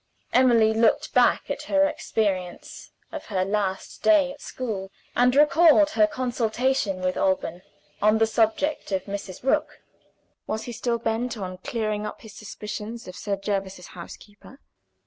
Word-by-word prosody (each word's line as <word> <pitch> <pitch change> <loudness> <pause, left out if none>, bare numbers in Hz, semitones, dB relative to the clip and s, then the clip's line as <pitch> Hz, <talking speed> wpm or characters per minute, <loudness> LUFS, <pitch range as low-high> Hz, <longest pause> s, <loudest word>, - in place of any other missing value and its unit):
Emily 235 -4 +5
looked 225 0 +2
back - - +3
at - - -3
her 290 0 +4
experience 205 - -3 0.2
of 315 -3 -7
her 185 -3 0
last 195 -1 -2
day 300 -4 +4
at 285 - -13
school, 210 -7 -5 0.3
and 250 +1 +4
recalled 300 +1 +5
her 215 -5 +4
consultation 240 -3 -1
with 185 0 -1
Alban 185 -2 0 0.4
on 215 +1 +4
the 225 - +4
subject 225 +6 0
of 190 -1 0
Mrs. 200 -1 -7
Rook. 300 +3 0 0.6
Was 220 - -3
he 245 - -6
still 235 +1 -1
bent 230 +1 -2
on 185 -2 -6
clearing 215 0 -2
up - - -9
his 220 -3 -12
suspicions 210 +2 -7
of 185 - -9
Sir 205 -1 -2
Jervis's 195 -2 -4
housekeeper? 205 +8 -12
220 Hz, 145 wpm, -25 LUFS, 195-250 Hz, 0.6 s, Emily